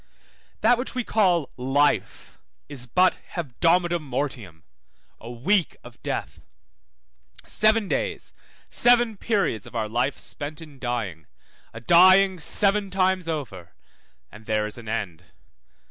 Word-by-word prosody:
That 240 +2 +4
which 255 - -5
we 250 - -1
call 180 - +1
life 135 +3 -1 0.3
is 130 -4 -7
but 180 +9 +2 0.2
hebdomada 175 +3 +1
mortium, 130 - -5 0.6
a 115 - -10
week 170 - 0
of - - -15
death, - - -5 1.0
seven 215 -1 +2
days, - - -3 0.3
seven 240 -2 +3
periods 195 - -1
of - - -13
our 110 -2 -1
life 125 +5 -1
spent 150 +1 -6
in 150 -4 -13
dying, 110 - -4 0.4
a 115 - -9
dying 185 +6 +5
seven 200 +5 +2
times 185 -2 0
over; 125 - -6 0.6
and 110 +1 -15
there 110 -1 0
is 105 +3 -5
an 110 -2 -10
end. 100 -8 -4
150 Hz, 125 wpm, -24 LUFS, 120-190 Hz, 1.0 s, dying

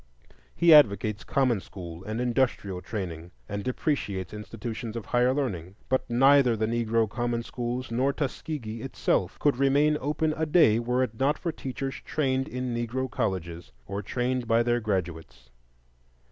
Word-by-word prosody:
He 170 -1 +6
advocates 105 -6 +5
common 130 -6 +1
school 85 -2 -9
and 110 +2 -3
industrial 120 -7 0
training, 90 -6 -5 0.2
and 100 0 -4
depreciates 105 - -2
institutions 110 +2 -6
of 115 - -5
higher 125 +1 +2
learning; 100 - -3
but 130 -1 0
neither 130 0 +5
the 110 - +1
Negro 115 0 +1
common 120 +1 -2
schools, 120 +1 -4
nor 130 +4 +2
Tuskegee 135 -5 -4
itself, 95 -7 -1
could 145 -4 +2
remain 145 +3 +3
open 155 +2 0
a 160 0 -1
day 150 -9 +5
were 125 +2 +1
it 115 -3 -5
not 140 +3 +2
for 170 - -2
teachers 135 -2 -5
trained 135 -2 0
in 125 -4 -3
Negro 120 +2 -2
colleges, 90 -7 -3
or 100 +1 -4
trained 125 +3 -2
by 115 +1 +3
their 120 0 +1
graduates. 80 - -4
120 Hz, 150 wpm, -27 LUFS, 105-135 Hz, 0.2 s, He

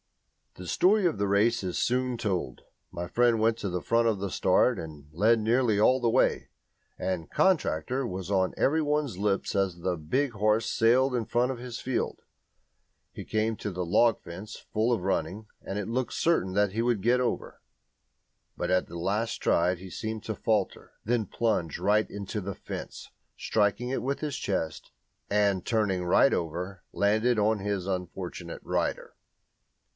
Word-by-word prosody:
The 90 - -9
story 200 - +3
of 165 - +1
the 100 - +1
race 105 +3 +2
is 90 -1 -3
soon 125 0 0
told. 100 -6 -2 0.3
My 85 0 -5
friend 120 +2 +3
went 110 +1 +3
to 100 - -3
the 90 -1 -3
front 115 0 +2
at 110 -3 +1
the 100 -1 -3
start - - +3
and 75 -3 -8
led 110 +7 +3
nearly 115 -1 +2
all 130 +4 +4
the 120 - +2
way, - - +2 0.5
and 90 -4 -3
"Contractor!" 135 - +1
was 95 -3 -5
on 95 -2 +2
every 160 +4 +2
one's 150 -8 -1
lips 100 +1 -1
as 95 -3 0
the 90 +1 -1
big 120 - -1
horse 110 +1 +1
sailed 125 +4 +3
along 125 -2 0
in - - -6
front 125 +2 +2
of 125 - -6
his 120 -1 -6
field. 130 -1 -2 0.9
He - - -7
came 110 +1 0
at - - -10
the 90 -3 -3
log 115 +6 +3
fence 100 +6 -9 0.2
full 110 +3 +2
of 115 -7 0
running, 95 +2 -2 0.2
and 95 - -5
it 105 - -3
looked 125 +2 -2
certain 160 - +1
that 100 0 +2
he 115 - 0
would 120 -4 +1
get 125 +4 +3
over. 125 - -3 1.0
But - - -2
at 90 0 +2
the 85 - -8
last 105 +7 -1
stride 90 +2 +1
he 95 +1 -10
seemed 110 +2 -4
to 110 -1 -4
falter, 105 -3 -1
then 115 -2 0
plunged 100 -9 -1
right 105 +1 +2
into 100 +1 -5
the 100 0 -5
fence, - - -8 0.3
striking 110 +3 0
it 135 - -1
with 140 +2 -2
his 150 -3 -3
chest, 80 -6 -3 0.4
and, 100 -3 +2
turning 105 -5 0
right 90 +9 +4
over, 90 +3 -3
landed 110 +4 +2
on 105 +1 +2
his 100 -2 -2
unfortunate 90 -2 -5
rider. - - -2
105 Hz, 175 wpm, -28 LUFS, 95-120 Hz, 1.0 s, all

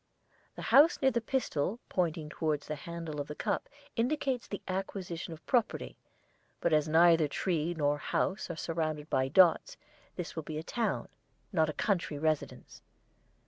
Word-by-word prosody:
The - - -7
house 300 +5 +7
near 265 -2 +4
the 235 -1 0
pistol 225 - -1
pointing 165 -4 -1
towards 155 -1 -1
the 155 - -3
handle 165 -3 -4
of 145 - -6
the 150 - -6
cup - - -2 0.3
indicates 255 0 0
the 200 - -6
acquisition 185 -3 -4
of 160 0 -10
property, 240 -4 0 0.6
but 165 - +1
as 155 0 +3
neither 165 0 +5
tree 170 +2 -1
nor 145 -1 +1
house 190 +6 -1
are 170 - -3
surrounded 155 -2 -3
by 130 0 +2
dots 185 - +4 0.4
this 180 -2 -5
will 160 - -2
be 155 0 -6
a 155 - -4
town, 230 +6 -1 0.5
not 160 -3 +3
a - - -2
country, 175 -6 0
residence. 155 0 -2
165 Hz, 160 wpm, -31 LUFS, 155-195 Hz, 0.6 s, house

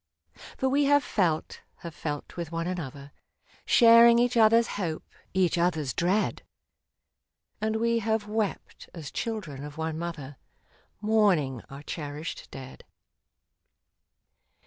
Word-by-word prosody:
" - - -41 0.2
For 265 - 0
we 280 +2 +2
have 285 0 +4
felt 170 -6 -1
— - - -43
have 170 - -6
felt 145 -1 -5
with 170 -2 -5
one 165 0 -2
another, 145 -6 -6 0.6
Sharing 235 0 +7
each 245 +1 +2
other's 230 +1 +5
hope, 170 -6 -4 0.3
each 180 -2 +2
other's 160 -7 0
dread; 185 - 0 1.2
And 220 0 0
we 230 +1 +1
have 220 -1 -1
wept, 215 -1 -4
as 160 -4 -7
children 185 -12 -4
of 150 +1 -9
one 160 0 -3
mother, 150 -5 -6 0.6
Mourning 195 - +2
our 140 +1 -10
cherished 150 0 -6
dead. 130 -1 -10
175 Hz, 125 wpm, -27 LUFS, 150-220 Hz, 1.2 s, Sharing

